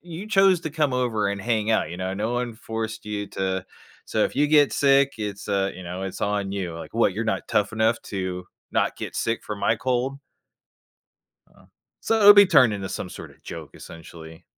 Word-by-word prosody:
you 175 +3 -8
chose 195 -4 +4
to 160 - -5
come 150 -3 0
over 120 -5 0
and 100 0 -3
hang 110 0 0
out, 110 - +1
you 85 - -6
know, 95 +1 -3
no 110 +4 -2
one 120 -1 -2
forced 110 0 -5
you 105 -1 -4
to 95 -1 -2 0.4
so, - - 0
if - - -3
you 145 +2 +2
get 150 -2 +5
sick, 140 0 +3
it's, 105 -1 -5
uh, 100 -1 +1
you 95 - -9
know, 90 +2 -6
it's 95 0 -6
on 100 -1 -1
you. 95 -4 -4
Like, 85 - -9
"What? 115 -4 +2
You're 110 +3 -3
not 110 - -2
tough 105 +2 0
enough 110 +1 +1
to 95 -2 -4 0.3
not - - 0
get - - -6
sick 115 0 -2
from 105 -2 -6
my 110 - +2
cold?" 130 +3 -1 1.3
Uh-huh. - - -23 0.3
So, 225 - +1
it'll 205 0 +10
be 200 -1 +8
turned 130 - +5
into 95 -2 -4
some - - -5
sorta - - -11
joke, 80 -4 -8
essentially. 80 -1 -12
110 Hz, 205 wpm, -24 LUFS, 95-130 Hz, 1.3 s, it'll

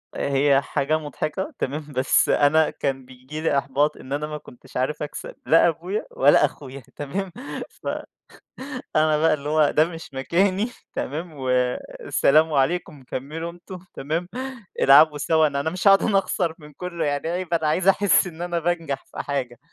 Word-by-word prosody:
هي 140 0 +2
حاجة 145 +2 0
مضحكة، 155 - -4
تمام 145 +2 -4
بس 130 +1 +3
أنا 155 +2 +4
كان 135 -2 -3
بييجي 130 +4 -9
لي 155 -3 +1
إحباط 140 +2 +1
إن 130 - -7
أنا 150 +1 -2
ما 150 0 -5
كنتش 125 -4 -12
عارف 135 +4 -1
اكسب 150 - -7
لا 165 +1 +5
أبويا 175 +6 -2
ولا 145 +2 +5
أخويا 135 -1 -8
تمام؟ 185 +7 -4 0.4
ف - - -12 1.1
أنا 155 0 +4
بقى 155 0 +3
اللي 145 0 -3
هو 155 -1 +3
ده 155 - +4
مش 165 -3 -9
مكاني، 185 - +1 0.2
تمام، 160 +4 -4
والسلام 135 +4 +1
عليكم 145 0 0
كمّلوا 155 +7 -5
أنتم 175 +1 -11
تمام؟ 160 +5 -3 0.5
العبوا 150 +2 +7
سوا 160 +1 +3
أنا 140 -1 -2
أنا 160 +3 -1
مش 180 +4 -1
هاقعُد 195 0 +7
أنا 200 - +3
اخسر 180 -3 0
من 150 -1 -14
كلّه 170 +2 -4
يعني 145 +1 -1
عيب 175 0 -3
أنا 160 -2 +1
عايز 180 +5 +1
احس 195 0 +4
إن 170 -1 -9
أنا 175 -1 -1
بانجح 165 -4 -2
في - - -14
حاجة. 130 -4 -3
155 Hz, 165 wpm, -23 LUFS, 140-170 Hz, 1.1 s, العبوا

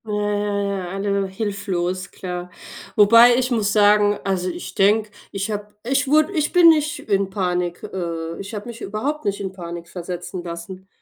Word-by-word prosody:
Ja, 215 - -4
ja, 205 0 -1
ja, 195 -3 -3
alle 195 +1 -1
hilflos, 190 -3 -3
klar. 180 -1 -6 0.5
Wobei 230 +3 +7
ich 255 0 0
muss 215 -4 +1
sagen 205 0 +4
also, 185 -2 -1
ich - - -7
denke, 210 +2 +3 0.2
ich 195 +2 -3
habe 210 0 -6
ich 270 +4 +1
wurde 310 +6 +3
ich 305 -4 0
bin 350 -2 +7
nicht 300 -2 +2
in 195 -2 +1
Panik 180 -3 -2
äh, 165 -2 -4
ich 200 +3 -7
habe 205 - -6
mich 235 0 -9
überhaupt 275 +10 -3
nicht 200 0 -1
in 195 -2 -4
Panik 170 -2 -8
versetzen 180 0 -6
lassen. 175 +2 -8
200 Hz, 175 wpm, -21 LUFS, 185-215 Hz, 0.5 s, Wobei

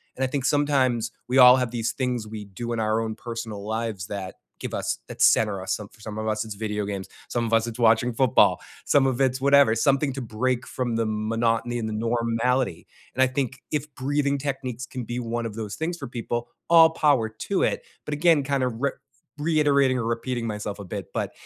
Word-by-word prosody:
And 130 - -2
I - - +2
think 130 0 -2
sometimes 130 -5 +2 0.2
we 125 +2 +1
all 125 0 +9
have 125 -3 -1
these 115 -1 -1
things 125 -4 -2
we 105 -1 -7
do 110 +5 -6
in 115 - -2
our 110 0 +1
own 110 -1 -3
personal 115 -4 -6
lives 110 -4 -3
that 95 -2 -5 0.2
give - - -5
us - - -2
that - - -7
center 105 -3 +4
us. 95 - -1
Some 105 - -7
of - - -30
for - - -21
some 110 0 -7
of 110 0 -3
us, 110 +1 -1
it's 110 -2 -7
video 105 0 -3
games. 100 -2 -5 0.2
Some 120 -1 -1
of 115 - -3
us, 115 0 +3
it's 115 - -6
watching 115 +1 +4
football. 130 +1 +4 0.2
Some 140 -2 +4
of 130 -1 -1
it's 130 -1 +1
whatever. 140 -4 +5
Something 135 +3 +2
to 135 - -5
break 125 +2 -1
from 120 -3 -2
the 115 0 +1
monotony 115 +2 0
and 110 -1 -3
the - - -4
normality. 115 0 0 0.3
And 130 - 0
I - - +4
think 130 -1 -2
if 150 -1 -3
breathing 140 +1 0
techniques 130 -3 -4
can 125 0 -6
be 120 +2 -4
one 120 0 -3
of 110 -2 -5
those 105 -2 -5
things 170 +2 -3
for 140 - -6
people, 120 0 -4 0.2
all 165 -1 +8
power 145 -8 +2
to 145 - -2
it. - - 0 0.2
But 150 - -3
again, 155 -1 +4
kind 135 -1 0
of 125 -2 0
r 140 - +1 0.4
reiterating 145 -4 +3
or 120 - -2
repeating 115 +1 -2
myself 105 -1 -4
a 100 - -7
bit, - - -6
but - - -2
120 Hz, 225 wpm, -25 LUFS, 110-135 Hz, 0.4 s, all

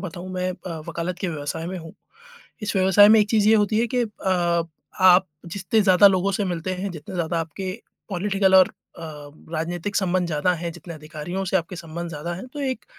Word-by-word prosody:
बताऊँ, 180 0 -7
मैं 185 0 -1
अ, 180 -2 -7
वकालत 170 +1 -4
के 185 - -2
व्यवसाय 160 +1 -4
में 185 +1 -4
हूँ, 165 -1 -11 0.7
इस 210 - -2
व्यवसाय 190 +2 +6
में 220 0 +7
एक 210 - +1
चीज़ 215 -2 +3
ये 220 - +6
होती 210 +1 +2
है 235 - +2
कि 250 - +3
अ, 180 -6 0 0.4
आप 185 0 +6 0.2
जितने 190 +4 0
ज़्यादा 190 0 +6
लोगों 195 +1 +1
से 200 +2 0
मिलते 180 0 -3
हैं, 190 +2 -4
जितने 160 0 -9
ज़्यादा 170 -1 -1
आपके 185 +4 -5 0.4
पॉलिटिकल 195 0 +1
और 185 - +7
अ, 170 - -14 0.5
राजनीतिक 175 +5 -3
संबंध 185 -2 +1
ज़्यादा 170 +2 +1
हैं, 170 0 -4
जितने 170 0 -10
अधिकारियों 155 +5 -5
से 190 - +2
आपके 175 +1 -3
संबंध 170 +1 -6
ज़्यादा 170 +2 -5
हैं 185 +8 -8
तो 295 - -5
एक, 260 -2 -3
180 Hz, 205 wpm, -23 LUFS, 170-195 Hz, 0.7 s, में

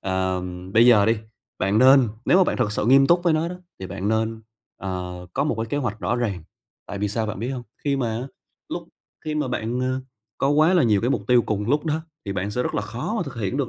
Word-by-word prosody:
ờ, 95 -1 -1 0.3
bây 115 +2 +7
giờ 105 -4 +6
đi, 115 0 +3 0.4
bạn 100 +3 +2
nên 130 -1 +7 0.2
nếu 185 - +5
mà 190 - +6
bạn - - -1
thực 105 -5 0
sự 105 +1 -1
nghiêm 135 +2 +6
túc 175 0 +4
với 170 - +3
nó 155 +2 +1
đó, 180 - -6 0.3
thì 95 - -5
bạn 100 +3 -4
nên, 110 0 -1 0.3
ờ, 90 -1 -5
có 140 - 0
một 150 - 0
cái 115 +1 -3
kế 145 - -3
hoạch 120 -7 -2
rõ 120 - 0
ràng. 100 -8 -2 0.4
Tại 100 - -6
vì 105 0 0
sao 110 +2 -1
bạn 105 - -4
biết 115 +4 -3
hông? 130 -2 -4 0.2
Khi 140 -1 +1
mà 125 -4 0
á, 125 - -5 0.4
lúc - - -5 0.4
khi 155 -1 -2
mà 150 -4 -1
bạn, 120 +3 -2
ờ, 130 +1 -1 0.4
có 135 - +2
quá 155 +5 +4
là 175 - +5
nhiều 105 -4 +3
cái 120 +5 0
mục - - 0
tiêu 125 -2 +5
cùng 105 +1 -2
lúc 150 +2 +2
đó 155 +1 0 0.2
thì 100 - -3
bạn 95 +1 -2
sẽ 125 +4 -1
rất - - -3
là - - 0
khó 120 - -4
mà 180 - 0
thực 135 - -8
hiện 110 +3 -2
được 140 -4 -1
120 Hz, 270 wpm, -23 LUFS, 105-135 Hz, 0.4 s, bây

